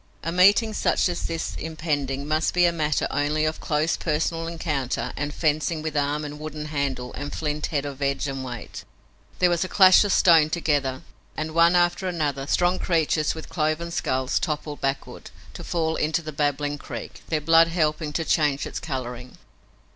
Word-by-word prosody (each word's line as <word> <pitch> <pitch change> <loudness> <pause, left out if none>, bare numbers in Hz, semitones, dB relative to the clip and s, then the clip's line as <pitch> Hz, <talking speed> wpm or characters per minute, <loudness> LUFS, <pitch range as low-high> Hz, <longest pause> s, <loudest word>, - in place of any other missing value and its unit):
A 165 - -2
meeting 200 +5 +5
such - - +1
as 175 - -3
this 165 0 -4
impending 145 -4 -3
must 155 +2 0
be 180 0 +5
a 170 - +4
matter 155 -3 0
only 150 +2 0
of 155 0 -2
close 155 +2 0
personal 165 +1 -1
encounter 150 -6 -2
and 145 +1 -3
fencing 155 +1 0
with 155 -1 -4
arm 145 +1 0
and 150 0 -7
wooden 155 0 -6
handle 140 -4 -3
and 145 0 -5
flint 150 -1 -2
head 145 -2 -2
of 140 -1 -7
edge 140 +1 0
and 135 -1 -4
weight. 120 -4 -7 0.5
There 180 -1 +3
was 170 0 +1
a - - -3
clash 185 0 +7
of 205 - -1
stone 165 -5 +5
together, 145 -5 -1 0.3
and, 155 +1 -3
one 170 +2 +5
after 175 +2 +2
another, 145 -6 -2
strong 180 +3 +2
creatures 160 -3 +1
with 160 - -8
cloven 155 +1 -1
skulls 130 -5 0
toppled 150 -2 -4
backward, 135 0 -3 0.2
to - - -9
fall 160 -2 -1
into 160 +2 0
the 155 0 -6
babbling 145 0 -1
creek, - - -8
their 155 - +1
blood 165 +2 +5
helping 155 -2 0
to 165 +2 -1
change 150 -4 +1
its - - -5
coloring. 125 -4 -6
155 Hz, 180 wpm, -24 LUFS, 145-165 Hz, 0.5 s, clash